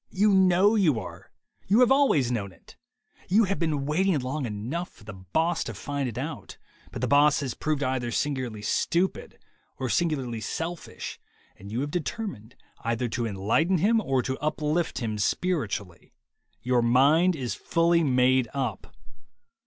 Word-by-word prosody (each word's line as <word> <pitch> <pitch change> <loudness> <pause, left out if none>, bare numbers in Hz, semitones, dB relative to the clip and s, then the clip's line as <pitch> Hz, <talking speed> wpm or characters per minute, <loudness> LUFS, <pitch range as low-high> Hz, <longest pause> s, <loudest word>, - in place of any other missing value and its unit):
You 205 +1 +2
know 190 +2 +5
you 170 - +3
are. - - -10 0.4
You 210 +6 +4
have 250 +1 +5
always 265 - +3
known 100 -5 -2
it. 90 - -19 0.5
You 210 +5 +5
have 195 -1 -1
been 155 -5 -1
waiting 175 +4 +1
long 135 +1 -3
enough 120 +12 -4
for 115 - -20
the 105 0 -9
boss 155 - -1
to - - -6
find 140 -3 -3
it 115 - -9
out, 135 - -6 0.3
but - - -6
the - - +2
boss 145 +3 +4
has 130 -4 -3
proved 155 -2 -2
either 130 -2 -1
singu 130 0 -1
larly 105 -1 -9
stupid 180 - -1 0.4
or 130 - -3
singularly 130 -8 -1
selfish, 165 +7 -5 0.4
and 100 +1 -11
you 120 +4 -2
have 145 +1 -3
determined 175 - -5 0.3
either 115 +1 -1
to 115 +1 -2
enlighten 115 - +1
him 220 +6 +3
or 135 - 0
to 130 +1 -3
uplift 155 +2 -1
him 110 -4 -3
spiritually. 105 - -2 0.5
Your 125 -1 +2
mind 145 +9 +4
is 125 -7 -3
fully 170 +4 +2
made 130 -2 +3
up. 125 -8 -4
140 Hz, 160 wpm, -26 LUFS, 120-170 Hz, 0.5 s, know